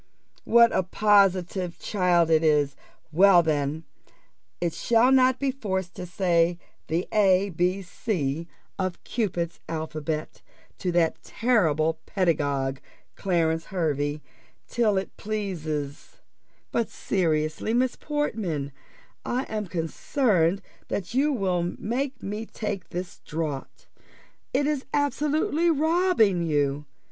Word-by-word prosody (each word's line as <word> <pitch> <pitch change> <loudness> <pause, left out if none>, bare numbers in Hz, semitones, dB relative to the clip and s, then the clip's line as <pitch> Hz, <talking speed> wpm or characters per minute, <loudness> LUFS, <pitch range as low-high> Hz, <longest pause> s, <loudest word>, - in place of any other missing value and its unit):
"What 235 0 +6
a - - +4
positive 185 -2 +2
child 175 -4 +2
it 160 0 +4
is! 150 -3 +3 0.4
Well, 180 +1 +6
then, 150 0 -1 0.8
it 170 -2 -1
shall 235 +2 +3
not 260 -1 +5
be 275 0 0
forced 190 -8 -3
to 180 - -5
say 175 -1 +2 0.3
the 165 +3 -1
a, 195 -2 +3
b, 180 +3 0
c, 170 -5 -2 0.3
of 185 -2 -3
Cupid's 175 -7 -2
alphabet, 155 -1 -4 0.4
to 180 - -1
that 170 -2 +1
terrible 160 -10 +1
pedagogue, 145 -7 0 0.4
Clarence 165 -4 0
Hervey, 150 -4 -1 0.4
till 220 -5 +1
it 190 - -3
pleases: 160 -9 -4 0.6
but 235 - 0
seriously, 155 0 -1
Miss 250 +2 +1
Portman, 210 - -2 0.5
I 250 +2 -1
am 215 -4 -4
concerned 180 - +1 0.2
that 195 +2 -4
you 280 +4 +3
will 180 -8 0
make 255 +4 -3
me 210 +3 -4
take 200 -4 -5
this 180 +1 -6
draught: 155 -4 -5 0.7
it 275 +2 +1
is 295 -2 0
absolutely 300 +4 +1
robbing 320 - +3
you. 145 -3 0
185 Hz, 115 wpm, -26 LUFS, 160-225 Hz, 0.8 s, What